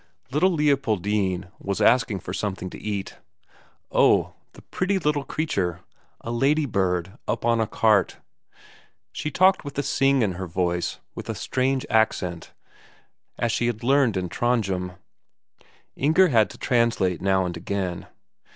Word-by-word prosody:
Little 150 +7 +3
Leopoldine 105 - 0
was 100 0 -3
asking 115 -5 +3
for 90 - -6
something 95 -2 -3
to - - -10
eat. 100 -2 -4 0.7
Oh, - - +3 0.2
the - - -15
pretty 190 +2 -1
little 150 -5 0
creature; 95 - -2 0.4
a 115 - -5
ladybird 110 - 0
up - - -2
on 115 -1 +3
a 110 - 0
cart! 105 -4 +2 0.9
She 150 - -4
talked 185 +6 +3
with 145 -2 -8
a 145 - 0
sing 135 -1 +2
in 100 - +1
her 90 +1 -5
voice, 90 0 -1 0.2
with - - -8
a - - -2
strange 130 0 -1
accent, 90 -6 0 0.9
as 120 - 0
she 120 - 0
had 115 -1 -3
learned 130 -5 +3
in 90 -1 -2
Trondhjem. 95 -3 -1 1.0
Inger 160 +6 +4
had 110 -5 +3
to - - -12
translate 115 - +1
now 95 -1 +2
and 90 -1 -4
again. 90 0 -4
110 Hz, 140 wpm, -24 LUFS, 95-135 Hz, 1.0 s, Inger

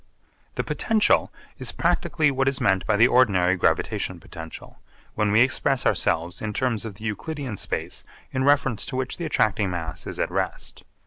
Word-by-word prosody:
The - - -1
potential 220 -1 +2 0.3
is - - -1
practically 150 -3 +1
what 135 0 0
is 135 -1 +1
meant 95 -1 +1
by 110 - +3
the 115 +3 +6
ordinary 95 -8 +4
gravitation 90 - 0
potential, 80 -1 -10 0.3
when 105 -1 +1
we 110 +3 +5
express 135 +1 +1
ourselves 85 +2 +1
in 110 -1 -3
terms 120 -2 -1
of 105 -3 -6
the 105 - -13
Euclidean 135 +2 -4
space - - -3 0.3
in 130 - -1
reference 135 -6 +2
to - - -4
which 130 0 -3
the 170 - -4
attracting 110 -9 +1
mass 85 -2 -5
is - - -6
at - - -1
rest. - - -3
115 Hz, 175 wpm, -24 LUFS, 95-135 Hz, 0.3 s, the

